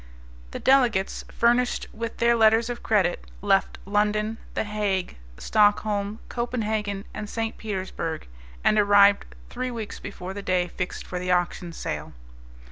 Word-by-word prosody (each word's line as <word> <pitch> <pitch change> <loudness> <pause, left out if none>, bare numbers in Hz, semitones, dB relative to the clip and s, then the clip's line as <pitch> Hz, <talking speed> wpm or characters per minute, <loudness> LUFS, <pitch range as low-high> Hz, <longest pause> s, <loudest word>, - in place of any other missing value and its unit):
The - - -6
delegates, 245 -8 +2
furnished 240 +1 +2
with 230 +1 -5
their 235 0 +4
letters 225 +1 +4
of 240 - -6
credit, 190 -5 +1 0.2
left 195 -1 +2
London. 210 +2 0 0.2
The - - +1
Hague, 205 -3 -1 0.2
Stockholm, 205 - +2
Copenhagen, 215 -4 -2
and 210 - -6
St. 225 0 -2
Petersburg, 185 -6 -4 0.4
and 215 - +4
arrived 205 0 +6 0.3
three 255 +1 -3
weeks 225 -4 -6
before 185 -1 -7
the 200 - -6
day 185 -2 +1
fixed 180 +1 -5
for 180 - -4
the 180 0 -1
auction 175 0 0
sale. - - -5
210 Hz, 135 wpm, -25 LUFS, 190-225 Hz, 0.4 s, arrived